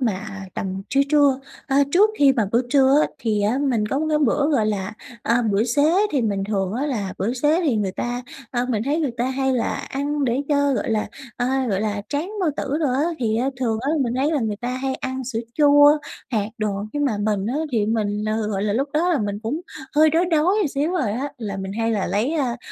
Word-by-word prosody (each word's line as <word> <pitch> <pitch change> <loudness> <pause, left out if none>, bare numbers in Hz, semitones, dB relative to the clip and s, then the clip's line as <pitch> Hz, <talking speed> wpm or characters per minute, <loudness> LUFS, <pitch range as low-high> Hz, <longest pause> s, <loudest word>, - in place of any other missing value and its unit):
mà 215 -3 -2 0.2
tầm 190 0 -4
trưa 275 - +2
trưa, 285 -3 +4 0.3
ơ, 270 -1 0 0.2
trước 415 +4 +5
khi 275 -2 +6
mà 225 -6 +1
bữa 235 +2 +3
trưa 275 +1 +5
á, - - +3
thì 210 -3 0
á 225 +6 +1
mình 245 -7 +1
có 275 - 0
một 315 - -1
cái 305 -1 +2
bữa, 290 +2 +2
gọi 230 -8 +2
là, 205 -1 -2 0.3
à, 235 +2 +2
bữa 205 +3 +2
xế, 250 +4 +1 0.3
thì 270 - +1
mình 200 -3 -1
thường 195 -3 -1
á 265 +6 -1
là 205 -9 -3
bữa 220 +5 0
xế 295 +7 +2
thì 255 -7 +2
người 195 -3 -1
ta 245 +3 -3 0.3
ơ, 245 -1 -1
mình 220 -3 0
thấy 290 +5 0
người 290 -5 0
ta 240 +2 -2
hay 265 0 0
là 245 - 0
ăn 285 +1 -1
để 250 +3 0
cho, 285 -1 +2
gọi - - -2
là, 215 -2 0 0.3
ơ, 245 0 0 0.2
gọi 195 -1 0
là, 210 -1 -2
tráng 305 +7 -2
bao 345 - +2
tử 285 +2 -2
đồ 315 - +1
á. 270 +3 +1 0.2
Thì 220 -3 0
á 255 +3 0
thường 225 -3 0
á, 280 - -1
mình 240 -1 -1
thấy 280 +4 +1
là 290 - +1
người 215 -2 -1
ta 245 +3 -5
hay 265 0 -2
ăn 260 0 -4
sữa 230 -2 -3
chua, 290 0 +6 0.3
hạt 210 -3 0
đồ, 205 -1 -2
nhưng 290 0 0
mà 230 -7 0
mình 205 -1 0
á 245 - -2 0.2
thì 215 -3 +1
mình, 210 -1 -1
ờ, 215 0 -1
gọi 200 -1 -2
là, 210 - 0
lúc 270 +6 0
đó 330 +4 +2
là 310 - +2
mình 205 -1 -2
cũng 275 +9 -2 0.4
hơi 310 0 +6
đói 335 +3 +2
đói 330 +6 +3 0.2
xíu 295 +5 0
rồi 265 - 0
á, 275 +5 -3
là 205 -4 -4
mình 190 0 -5
hay 225 +2 -1
là 205 -3 0
lấy, 235 +11 0
ơ, 260 -6 0
245 Hz, 250 wpm, -22 LUFS, 215-285 Hz, 0.4 s, khi